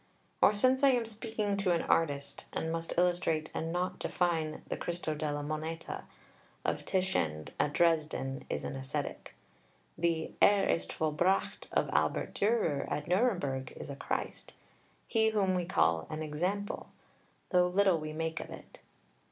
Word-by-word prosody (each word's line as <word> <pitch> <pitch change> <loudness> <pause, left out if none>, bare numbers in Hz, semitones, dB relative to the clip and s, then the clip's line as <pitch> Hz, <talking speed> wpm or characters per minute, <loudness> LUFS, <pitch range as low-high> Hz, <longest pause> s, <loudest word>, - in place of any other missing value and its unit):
Or, 210 - +6
since 255 +5 +3
I 280 - +7
am 240 -2 +1
speaking 220 -2 -2
to 190 -3 +2
an 170 - +1
artist 140 -3 0
and 160 - -2
must 165 0 -3
illustrate 175 -3 +1
and 165 +1 -2
not 180 +2 -1
define, 160 -3 0
the - - -2
"Cristo 170 -2 -3
della 150 -1 -2
Moneta" 155 +2 -4 0.6
of - - -1
Titian 85 - 0
at 145 - +1
Dresden 155 -5 +1
is - - -2
an - - -4
ascetic. 135 0 -4 0.6
The 165 -1 0
"Er 200 -1 +6
ist 85 0 0
vollbracht" 160 +5 0
of - - +2
Albert - - +1
Dürer 205 -9 +1
at 150 - -2
Nuremberg 175 - +1
is - - -7
a - - -5
Christ - - -4 0.5
he 220 -1 +3
whom 200 -3 +2
we 180 -1 0
call 80 - +2
an 155 0 -3
example, 180 +7 -2 0.6
though 180 -1 +5
little 185 -1 +3
we 155 0 -5
make 160 +1 -2
of - - -7
it. - - -11
165 Hz, 150 wpm, -32 LUFS, 150-190 Hz, 0.6 s, I